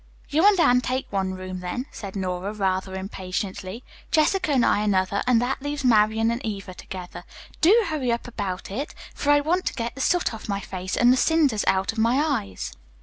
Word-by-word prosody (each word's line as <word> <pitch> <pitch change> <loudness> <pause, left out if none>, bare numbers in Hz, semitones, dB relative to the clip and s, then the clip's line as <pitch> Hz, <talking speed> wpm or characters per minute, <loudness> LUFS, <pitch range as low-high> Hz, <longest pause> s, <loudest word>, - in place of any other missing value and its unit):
"You 320 +7 +4
and 405 -3 +5
Anne 250 -6 +5
take 255 +1 -2
one 190 -2 -1
room, 185 0 -6
then," 180 +8 -4
said 200 -2 -8
Nora 185 +1 -3
rather 190 -2 -1
impatiently, 190 +2 -5 0.3
"Jessica 320 +1 +2
and 260 -4 +3
I - - +3
another 200 -1 +1
and 245 -2 +5
that 265 +2 -2
leaves 290 -1 -3
Marian 220 -1 +4
and 235 +2 -3
Eva 200 -4 -5
together. 180 0 -8 0.4
Do 425 +8 +6
hurry 285 -8 -1
up 235 +1 -2
about 195 -6 -4
it, 275 +9 -4 0.2
for 290 - -3
I 290 0 +6
want 355 +5 0
to - - -2
get 235 -1 -3
the 270 - -6
soot 355 -2 +1
off 220 -1 -8
my 200 0 0
face, 185 -1 -5
and 245 +1 +6
the - - +1
cinders 290 -9 +3
out 190 0 +2
of 225 - -6
my 230 +3 +3
eyes." 100 - -2
220 Hz, 205 wpm, -24 LUFS, 190-270 Hz, 0.4 s, Do